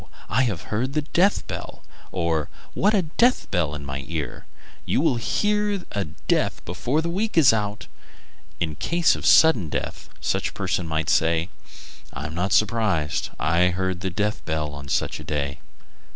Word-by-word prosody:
I 130 Hz, +4 st, +3 dB
have 100 Hz, -9 st, -2 dB
heard 130 Hz, +7 st, -1 dB
a 150 Hz, -, +1 dB
death 180 Hz, +6 st, +2 dB
bell!" -, -, -7 dB, 0.3 s
or, 85 Hz, -4 st, 0 dB, 0.2 s
"What 210 Hz, +3 st, +3 dB
a 195 Hz, -, +3 dB
death 235 Hz, +10 st, +2 dB
bell 80 Hz, -4 st, 0 dB
in 70 Hz, -1 st, -7 dB
my 70 Hz, 0 st, -4 dB
ear! 75 Hz, -6 st, -5 dB, 0.4 s
You -, -, +1 dB
will 145 Hz, -4 st, +2 dB
hear 210 Hz, -, +1 dB
of 195 Hz, -3 st, -4 dB
a 100 Hz, -2 st, -1 dB, 0.2 s
death -, -, +1 dB
before 125 Hz, -, -1 dB
the 170 Hz, -, -1 dB
week 210 Hz, +2 st, -1 dB
is 145 Hz, -8 st, +7 dB
out." 105 Hz, -1 st, -2 dB, 0.7 s
In 80 Hz, -3 st, -1 dB
case 170 Hz, -, +2 dB
of -, -, -6 dB
a -, -, +3 dB
sudden 125 Hz, -, +6 dB
death, -, -, -4 dB
such -, -, 0 dB
a -, -, -15 dB
person 90 Hz, -, -1 dB
might 80 Hz, -1 st, -1 dB
say: 80 Hz, +2 st, +2 dB, 0.6 s
"I 70 Hz, +2 st, -5 dB
am 75 Hz, -, -5 dB
not 90 Hz, +4 st, -1 dB
surprised; 100 Hz, -9 st, +1 dB
I 85 Hz, +3 st, +3 dB
heard 90 Hz, 0 st, -1 dB
a 95 Hz, -, 0 dB
death 105 Hz, +3 st, -1 dB
bell 75 Hz, -1 st, -2 dB
on 70 Hz, -1 st, -8 dB
such -, -, -1 dB
a -, -, -8 dB
day." 70 Hz, -2 st, -3 dB
95 Hz, 180 wpm, -24 LUFS, -, 0.7 s, is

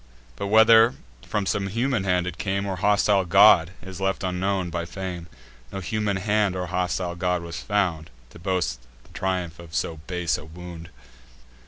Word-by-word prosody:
But, 100 Hz, -, -4 dB
whether 110 Hz, +2 st, +6 dB, 0.3 s
from 105 Hz, -1 st, -1 dB
some 95 Hz, +1 st, -1 dB
human 115 Hz, 0 st, -1 dB
hand 90 Hz, -1 st, +1 dB
it 90 Hz, -1 st, -6 dB
came, 100 Hz, +1 st, -1 dB
Or 95 Hz, -2 st, -3 dB
hostile 100 Hz, +1 st, +3 dB
god, 90 Hz, -2 st, +6 dB
is 95 Hz, -1 st, -8 dB
left 95 Hz, +1 st, -1 dB
unknown 95 Hz, 0 st, -1 dB
by 85 Hz, 0 st, -2 dB
fame: 90 Hz, -1 st, -6 dB, 0.4 s
No 95 Hz, -, -5 dB
human 105 Hz, +1 st, -1 dB
hand 105 Hz, 0 st, +1 dB
or 90 Hz, 0 st, -2 dB
hostile 90 Hz, 0 st, -2 dB
god 90 Hz, 0 st, -1 dB
was 85 Hz, 0 st, -6 dB
found, 90 Hz, -6 st, -1 dB, 0.2 s
To -, -, -13 dB
boast 85 Hz, -9 st, -1 dB, 0.2 s
the -, -, -23 dB
triumph 90 Hz, -3 st, -2 dB
of 85 Hz, -1 st, -10 dB
so 80 Hz, -, -2 dB
base 90 Hz, -3 st, -1 dB
a 75 Hz, -, -11 dB
wound. 85 Hz, +1 st, -10 dB
95 Hz, 170 wpm, -24 LUFS, 85-100 Hz, 0.4 s, whether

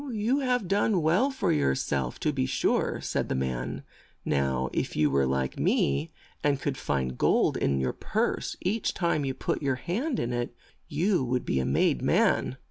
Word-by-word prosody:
"You 225 Hz, +6 st, +1 dB
have 250 Hz, -6 st, 0 dB
done 200 Hz, -2 st, +2 dB
well 180 Hz, -, +3 dB
for 265 Hz, -, 0 dB
your 70 Hz, -2 st, +2 dB
self, 65 Hz, -3 st, -2 dB
to -, -, +1 dB
be 65 Hz, -, 0 dB
sure," -, -, 0 dB
said -, -, -2 dB
the -, -, 0 dB
man. 65 Hz, -2 st, -3 dB, 0.4 s
"Now 65 Hz, -2 st, 0 dB
if -, -, -2 dB
you 75 Hz, -2 st, +3 dB
were 70 Hz, -1 st, +2 dB
like 65 Hz, 0 st, -1 dB
me, 70 Hz, +3 st, +1 dB, 0.3 s
and 145 Hz, -2 st, +2 dB
could 135 Hz, 0 st, -2 dB
find 65 Hz, -, -2 dB
gold -, -, +3 dB
in 70 Hz, -1 st, +1 dB
your 65 Hz, -1 st, 0 dB
purse -, -, -2 dB
each 210 Hz, +4 st, -1 dB
time 170 Hz, -5 st, 0 dB
you 135 Hz, -1 st, -2 dB
put -, -, -2 dB
your 135 Hz, -3 st, +1 dB
hand 230 Hz, -, -2 dB
in 120 Hz, +1 st, -2 dB
it, 120 Hz, 0 st, -3 dB, 0.3 s
you 170 Hz, +2 st, +1 dB
would 125 Hz, 0 st, -1 dB
be 65 Hz, -, 0 dB
a 65 Hz, -, 0 dB
made 65 Hz, -2 st, +2 dB
man." -, -, +2 dB
125 Hz, 190 wpm, -28 LUFS, -, 0.4 s, well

